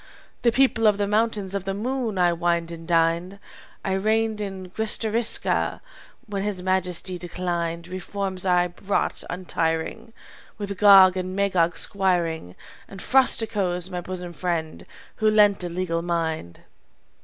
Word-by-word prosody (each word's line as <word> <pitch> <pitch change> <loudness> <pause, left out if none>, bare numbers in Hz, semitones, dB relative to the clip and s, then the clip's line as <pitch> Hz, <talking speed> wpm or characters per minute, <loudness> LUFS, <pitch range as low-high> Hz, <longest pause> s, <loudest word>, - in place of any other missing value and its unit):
"The 235 - +3
people 240 -3 +3
of 210 -1 +4
the 205 - 0
Mountains 210 -2 0
of 195 -1 -3
the 195 0 -2
Moon 235 -1 -2
I 175 -1 +3
wined 170 0 0
and 165 -1 -9
dined. 170 +3 +1 0.5
I 190 - 0
reigned 215 +2 0
at 190 -2 -6
Gristariska 220 +1 +1 0.5
when 205 -4 -4
His 195 -3 -3
Majesty 185 -1 0
declined. 170 -1 -3
Reforms 185 +1 -4
I 180 -2 +2
wrought 200 0 -1
untiring, 180 +5 -2 0.5
With 200 -1 -4
Gog 195 -3 +8
and 185 0 -4
Magog 185 -4 +1
squiring, 170 - 0 0.3
And 195 - -11
Frosticos, 200 -8 +1
my 180 -1 -3
bosom 180 -1 -6
friend, 165 -2 -3 0.3
who 215 0 +3
lent 205 -3 +4
a 175 - -3
legal 170 -1 -2
mind. 165 - -3
185 Hz, 135 wpm, -24 LUFS, 175-205 Hz, 0.5 s, Gog